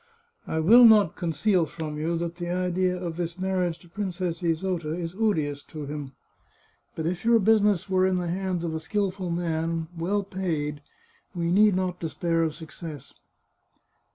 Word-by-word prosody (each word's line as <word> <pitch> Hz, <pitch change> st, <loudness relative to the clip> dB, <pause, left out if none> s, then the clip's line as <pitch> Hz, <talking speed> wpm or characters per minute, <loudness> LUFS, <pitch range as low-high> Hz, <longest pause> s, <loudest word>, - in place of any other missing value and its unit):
I 160 Hz, -, -1 dB
will 225 Hz, +10 st, +7 dB
not 215 Hz, -6 st, +6 dB
conceal 170 Hz, +2 st, +1 dB
from 155 Hz, -2 st, -6 dB
you 165 Hz, +2 st, -1 dB
that 170 Hz, 0 st, -4 dB
the 175 Hz, -1 st, -4 dB
idea 180 Hz, 0 st, 0 dB
of 170 Hz, -2 st, -5 dB
this 170 Hz, -1 st, -3 dB
marriage 185 Hz, -3 st, -1 dB
with 170 Hz, -1 st, -20 dB
Princess 185 Hz, -3 st, -3 dB
Isota 165 Hz, -1 st, -1 dB
is 170 Hz, -1 st, -4 dB
odious 160 Hz, -9 st, 0 dB
to 155 Hz, -2 st, -7 dB
him. 145 Hz, -1 st, -6 dB, 0.8 s
But 160 Hz, -, -3 dB
if 175 Hz, +2 st, -2 dB
your 230 Hz, 0 st, +5 dB
business 210 Hz, -3 st, +3 dB
were 185 Hz, -1 st, +3 dB
in 185 Hz, -1 st, +1 dB
the 175 Hz, -1 st, -2 dB
hands 180 Hz, 0 st, -2 dB
of 165 Hz, -2 st, -2 dB
a 160 Hz, -, -2 dB
skilful 190 Hz, +1 st, -2 dB
man, 165 Hz, -1 st, -2 dB
well 190 Hz, +5 st, 0 dB
paid, 165 Hz, -7 st, -3 dB, 0.5 s
we 170 Hz, -1 st, -1 dB
need 205 Hz, +1 st, +5 dB
not 185 Hz, -1 st, -1 dB
despair 165 Hz, +1 st, -1 dB
of 160 Hz, -2 st, 0 dB
success." 160 Hz, -3 st, -9 dB
175 Hz, 165 wpm, -26 LUFS, 160-190 Hz, 0.8 s, will